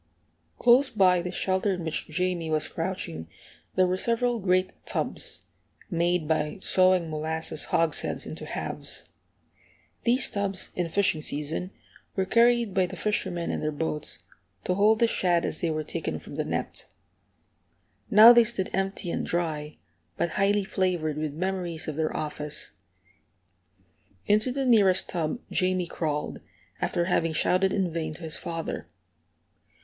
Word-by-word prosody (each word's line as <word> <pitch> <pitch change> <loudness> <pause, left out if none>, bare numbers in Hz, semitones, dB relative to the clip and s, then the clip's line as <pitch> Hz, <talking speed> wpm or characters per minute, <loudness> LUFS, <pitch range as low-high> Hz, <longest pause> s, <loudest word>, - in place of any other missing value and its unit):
Close 250 +3 +5
by 185 -5 +4
the 180 - -4
shelter 190 +2 0
in 175 - -6
which 160 -1 -2
Jamie 175 0 -1
was 155 0 +1
crouching 165 - -4 0.5
there 185 - +4
were 180 +1 0
several 235 +3 +1
great 185 -1 +2
tubs, - - -4 0.5
made 170 -1 +1
by 155 +3 0
sawing 185 -2 +3
molasses 160 +1 -2
hogsheads 165 -1 +1
into - - -7
halves. - - -5 0.9
These 250 +2 +2
tubs, 200 -2 -3
in 175 -2 -1
fishing 175 -4 +1
season, 150 +5 -1 0.5
were 190 - +1
carried 235 0 +3
by 185 -1 +2
the 185 - -8
fishermen 185 -3 -1
in - - -2
their 155 - -1
boats, 150 0 -4 0.4
to 180 - 0
hold 210 +3 +4
the 235 - +4
shad 175 -6 +2
as - - -3
they 170 - +1
were 155 -1 -1
taken - - -4
from - - -11
the - - -2
net. - - -4 1.2
Now 220 +2 +10
they 235 0 +7
stood 220 -5 -1
empty 195 -2 -2
and - - -2
dry, 155 -3 -2 0.4
but 170 - 0
highly 200 +3 +2
flavored 175 -6 -1
with 155 -2 -3
memories 175 -2 -2
of 155 - -3
their 155 0 -1
office. 150 -1 -4 1.5
Into 215 +4 +2
the 270 +1 -1
nearest 205 -7 +4
tub 170 +7 -2
Jamie 185 -1 +1
crawled, 150 -3 -3 0.4
after 175 -1 0
having 165 -2 +1
shouted 185 +4 +2
in 185 -4 0
vain 160 -2 -3
to 175 - -13
his 160 -2 -4
father. 165 -1 -5
180 Hz, 145 wpm, -27 LUFS, 160-195 Hz, 1.5 s, Now